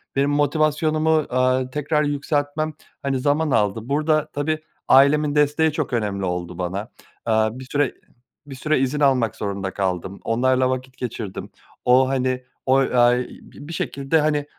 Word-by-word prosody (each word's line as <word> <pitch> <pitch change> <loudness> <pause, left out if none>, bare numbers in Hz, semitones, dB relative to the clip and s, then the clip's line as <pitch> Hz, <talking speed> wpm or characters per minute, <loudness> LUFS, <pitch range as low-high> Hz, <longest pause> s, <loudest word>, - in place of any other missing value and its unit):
Benim 140 +1 +2
motivasyonumu, 155 +2 +1 0.2
aaa, 130 0 +1
tekrar 150 +3 0
yükseltmem, 145 +1 -1 0.3
hani, 135 -2 -1
zaman 145 +3 +1
aldı. 105 -2 +2
Burada, 155 +1 +1
tabii 155 +2 -1 0.3
ailemin 145 +2 +5
desteği 150 +2 +3
çok 150 -4 -3
önemli 100 -4 -1
oldu 90 -1 -4
bana, 95 +6 -4 0.3
aaa, 110 +2 +1
bir 130 - -8
süre 145 0 0 0.5
bir 140 -2 -9
süre 155 +2 0
izin 135 +3 0
almak 130 -6 +2
zorunda 100 -2 -3
kaldım. 95 0 -3
Onlarla 130 +2 +2
vakit 130 0 -4
geçirdim. 110 -5 -5 0.4
O, 130 +1 +5
hani, 130 -1 -1 0.2
oy 135 -1 +2
ay 120 0 +5
bi 145 - -13
bir 165 - -7
şekilde, 140 0 0
hani, 150 -1 0
135 Hz, 150 wpm, -22 LUFS, 120-150 Hz, 0.5 s, ailemin